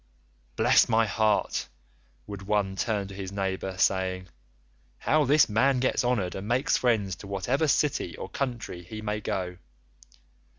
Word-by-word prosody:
'Bless - - +4
my 115 0 +4
heart,' 105 0 0 0.6
would 100 -2 -7
one 100 -1 0
turn 100 -1 -1
to 100 - -10
his 95 -1 -6
neighbour, 95 -1 -3
saying, 95 -1 0 0.7
'how 155 -1 +2
this 145 +2 +5
man 125 +5 +2
gets 130 0 +1
honoured 110 -8 0
and 95 +2 -6
makes 130 +6 +2
friends 105 -7 +1
to 100 - -10
whatever 120 - 0
city 150 +1 0
or - - -6
country 120 -9 -4
he 100 +5 -8
may 105 0 -2
go. 90 -2 -3
105 Hz, 145 wpm, -27 LUFS, 95-125 Hz, 0.7 s, this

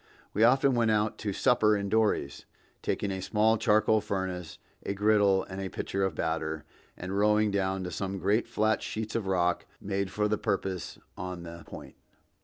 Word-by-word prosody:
We 105 - +2
often 135 +3 +5
went 115 -2 +2
out 105 0 +1
to 105 - -2
supper 110 -1 +3
in 100 0 -3
dories, 105 -9 0 0.4
taking 100 - -1
a 95 -1 -3
small 110 +3 +2
charcoal 110 +1 +3
furnace, 95 -4 -4 0.3
a 100 - -3
griddle 100 -2 +3
and 95 +1 -7
a 95 - -3
pitcher 95 +1 -2
of 95 -4 -1
batter, 80 -1 -2 0.3
and 95 +2 -5
rowing 105 +1 +3
down 95 -1 0
to 90 - -5
some 95 +3 -3
great 100 +6 +1
flat 110 -1 +1
sheets 110 0 -4
of 110 -4 -2
rock 90 -2 +1
made 100 -1 -2
for 105 +1 0
the 105 0 0
purpose 95 -2 -2 0.2
on 90 -1 -6
the 85 0 -9
Point. - - -10
100 Hz, 180 wpm, -29 LUFS, 95-110 Hz, 0.4 s, often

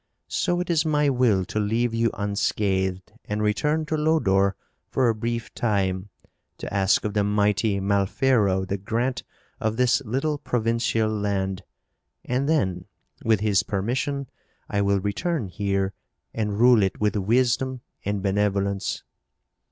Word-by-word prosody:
So 175 -1 +1
it 180 0 -1
is 160 -2 +3
my 150 -2 +2
will 120 -8 +2
to 110 - -3
leave 115 +3 0
you 115 0 +2
unscathed 95 -2 -1
and 105 0 -2
return 150 +9 +1
to 155 - -1
Lodore 100 - +2 0.3
for 130 -2 +2
a - - +3
brief 115 +1 -4
time 100 -3 -1 0.5
to - - -7
ask 100 +1 +2
of 105 - -2
the 105 -1 +2
mighty 105 0 +1
Malfero 100 0 +2
the 100 +1 -2
grant 120 +5 -1 0.4
of 110 0 -1
this 125 +2 +3
little 135 +6 -1
provincial 115 -2 0
land. 100 -3 -1 0.6
And 130 +4 0
then, 95 - 0 0.4
with 110 -3 +2
his 105 -2 +3
permission, 125 +8 -2 0.4
I 100 - 0
will 100 0 +2
return 110 - -2
here 100 0 -1 0.4
and 105 -2 -2
rule 120 -1 +6
it 95 -1 0
with 105 -1 +1
wisdom 125 +5 +1 0.2
and 100 -1 -2
benevolence. 100 0 0
105 Hz, 140 wpm, -24 LUFS, 100-125 Hz, 0.6 s, rule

